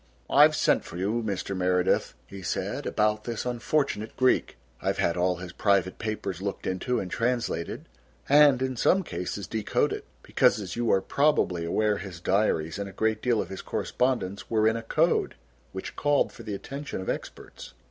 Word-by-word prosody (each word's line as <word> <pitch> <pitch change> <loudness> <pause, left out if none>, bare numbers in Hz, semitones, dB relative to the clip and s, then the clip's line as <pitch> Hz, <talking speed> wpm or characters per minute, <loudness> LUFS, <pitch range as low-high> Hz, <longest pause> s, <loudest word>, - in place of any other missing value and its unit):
"I've - - +7
sent - - +2
for 85 - -9
you, 105 +6 0
Mr. 100 -2 -3
Meredith," 90 -1 +1
he 100 +7 -10
said, 90 - -3
"about 105 0 +1
this 120 -1 -3
unfortunate 120 -2 -1
Greek. 130 0 +2 0.2
I've - - 0
had 85 - +1
all 90 0 +1
his 90 0 -8
private 100 -3 +1
papers 100 -4 -4
looked 100 0 -4
into 120 +7 -1
and 90 -2 -5
translated 115 -8 -2 0.4
and 140 -2 +6
in 130 -1 -2
some 190 +10 +3
cases 90 - -4
decoded, 110 -2 -1 0.2
because - - +3
as 95 -4 -5
you 120 -1 +1
are 95 - +4
probably 115 - +1
aware 105 +4 +1
his 95 -4 -8
diaries 85 -3 +1
and 100 -1 -4
a - - -10
great 110 +3 0
deal 120 -3 +2
of - - -13
his 95 - -6
correspondence 120 -7 -1
were 110 -1 +3
in 110 - +2
a 115 - -3
code 115 - +1 0.4
which 95 - -7
called 145 -1 +2
for - - -11
the 105 -3 -4
attention 140 +6 -6
of 95 - -6
experts." - - -6
105 Hz, 180 wpm, -27 LUFS, 95-120 Hz, 0.4 s, I've